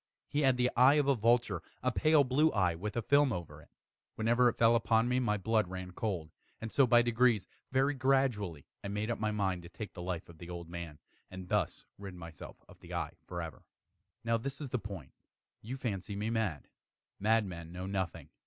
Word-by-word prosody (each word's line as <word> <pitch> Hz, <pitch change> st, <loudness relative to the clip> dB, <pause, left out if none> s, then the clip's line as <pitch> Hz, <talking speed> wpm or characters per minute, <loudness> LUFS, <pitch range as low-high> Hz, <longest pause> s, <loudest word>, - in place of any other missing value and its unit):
He 145 Hz, -, -1 dB
had 130 Hz, -3 st, +4 dB
the 125 Hz, 0 st, +2 dB
eye 130 Hz, +4 st, +7 dB
of 145 Hz, -2 st, +2 dB
a 140 Hz, -, +5 dB
vulture 115 Hz, -6 st, +2 dB, 0.2 s
a 130 Hz, -, +2 dB
pale 155 Hz, +4 st, +4 dB
blue 140 Hz, +5 st, +3 dB
eye, 90 Hz, -5 st, +2 dB
with 105 Hz, +7 st, -5 dB
a 115 Hz, -, 0 dB
film 145 Hz, +2 st, +4 dB
over 80 Hz, -6 st, -5 dB
it. -, -, -20 dB, 0.5 s
Whenever 120 Hz, +2 st, +4 dB
it -, -, -5 dB
fell 115 Hz, 0 st, +5 dB
upon 115 Hz, 0 st, +3 dB
me, 125 Hz, +1 st, +2 dB
my 105 Hz, -4 st, +1 dB
blood 110 Hz, 0 st, +1 dB
ran 95 Hz, 0 st, -6 dB
cold; 90 Hz, -5 st, -3 dB, 0.3 s
and 110 Hz, 0 st, -6 dB
so 135 Hz, -2 st, +4 dB
by 120 Hz, 0 st, +6 dB
degrees 120 Hz, -4 st, +3 dB, 0.2 s
very 135 Hz, +2 st, +3 dB
gradually 125 Hz, -, +1 dB, 0.2 s
I -, -, -4 dB
made 105 Hz, +3 st, -2 dB
up 115 Hz, -, -3 dB
my 110 Hz, 0 st, 0 dB
mind 95 Hz, -4 st, -1 dB
to 85 Hz, -, -11 dB
take 105 Hz, +3 st, -7 dB
the 90 Hz, -, -8 dB
life 90 Hz, 0 st, -4 dB
of 85 Hz, -2 st, -15 dB
the 85 Hz, -, -9 dB
old 85 Hz, -1 st, -6 dB
man, 85 Hz, -3 st, -7 dB, 0.3 s
and 95 Hz, -1 st, -9 dB
thus -, -, 0 dB
rid 100 Hz, -2 st, -8 dB
myself 85 Hz, -4 st, -10 dB
of -, -, -16 dB
the -, -, -8 dB
eye -, -, -2 dB
forever. 85 Hz, -2 st, -6 dB, 0.6 s
Now 115 Hz, 0 st, +2 dB
this 135 Hz, +4 st, -4 dB
is 145 Hz, -3 st, -5 dB
the 125 Hz, -, -1 dB
point. 95 Hz, -9 st, -8 dB, 0.5 s
You 125 Hz, +5 st, -5 dB
fancy 100 Hz, -5 st, -3 dB
me 105 Hz, +3 st, -2 dB
mad. 105 Hz, -, -1 dB, 0.5 s
Madmen 95 Hz, -6 st, 0 dB
know 90 Hz, +1 st, -5 dB
nothing. 95 Hz, -2 st, -3 dB
105 Hz, 210 wpm, -32 LUFS, 90-125 Hz, 0.6 s, eye